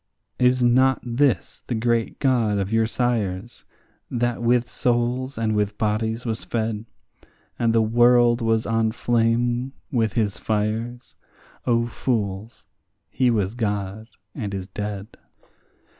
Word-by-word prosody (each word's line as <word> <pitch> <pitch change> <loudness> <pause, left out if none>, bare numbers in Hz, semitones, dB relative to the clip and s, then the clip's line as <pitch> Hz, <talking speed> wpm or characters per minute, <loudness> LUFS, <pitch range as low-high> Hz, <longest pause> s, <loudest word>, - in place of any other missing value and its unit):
Is 125 0 +3
not 130 +2 +4
this 125 +2 0
the 120 - -1
great 115 0 0
God 120 -6 +2
of 100 +2 -2
your 115 0 +3
sires, 115 -4 -2 0.4
that 120 -1 -1
with 120 +1 +2
souls 125 +2 -1
and 110 -1 0
with 105 0 0
bodies 110 +1 -1
was 115 -2 -3
fed, 110 -1 -2 0.7
And 115 -1 +2
the 115 -1 +3
world 120 +1 +4
was 115 -1 +1
on 115 -1 +1
flame 120 +2 +1 0.2
with 115 -6 +1
his 105 -4 0
fires? 110 +3 -2 0.5
O 115 -1 +3
fools, 110 -3 -3 0.5
he 130 -1 +2
was 105 -4 0
God, 105 -2 -3 0.3
and 105 -7 -4
is 95 -1 -5
dead. 105 +1 -6
115 Hz, 130 wpm, -23 LUFS, 110-120 Hz, 0.7 s, not